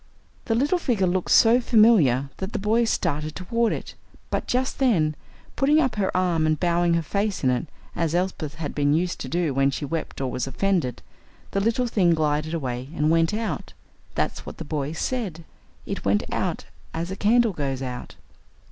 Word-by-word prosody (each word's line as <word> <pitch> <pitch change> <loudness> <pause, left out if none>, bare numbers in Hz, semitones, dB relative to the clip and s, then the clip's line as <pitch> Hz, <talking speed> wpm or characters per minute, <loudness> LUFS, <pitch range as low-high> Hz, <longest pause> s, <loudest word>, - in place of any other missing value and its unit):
The 225 - +1
little 290 +9 +2
figure 230 - +1
looked 180 0 0
so 235 +2 +6
familiar 185 - +4
that 190 +3 -5
the - - 0
boys 225 +3 +2
started 155 -2 -1
toward 230 +5 0
it, - - -5 0.4
but - - -1
just 255 +1 -1
then, 180 - +3 0.4
putting 295 +3 +4
up 260 -6 +1
her 195 -2 +1
arm 170 -4 +2
and 155 -1 +1
bowing 175 -1 +2
her 165 - 0
face 200 +3 -1
in 130 - +4
it, 125 +6 -1 0.3
as 165 -1 0
Elsbeth 175 -5 -2
had 155 -2 -5
been 145 0 +2
used 175 +2 -1
to 130 - -5
do 170 -2 0
when 135 +1 +3
she 140 +2 -3
wept 160 +3 -4
or 130 -2 -2
was 125 +1 -2
offended, 170 - -1 0.5
the 195 - 0
little 230 +4 +1
thing 185 -8 +3
glided 155 +1 0
away 130 -4 -4
and 150 0 +2
went 165 0 +3
out. 210 -8 -3 0.4
That's - - -1
what - - -9
the - - -6
boys 150 +1 -3
said. 200 -11 -3 0.4
It - - -4
went 100 +1 +2
out - - -2 0.3
as 170 +3 -3
a - - -3
candle 225 +2 +3
goes 135 -4 -3
out. 125 -1 -6
170 Hz, 190 wpm, -24 LUFS, 150-215 Hz, 0.5 s, so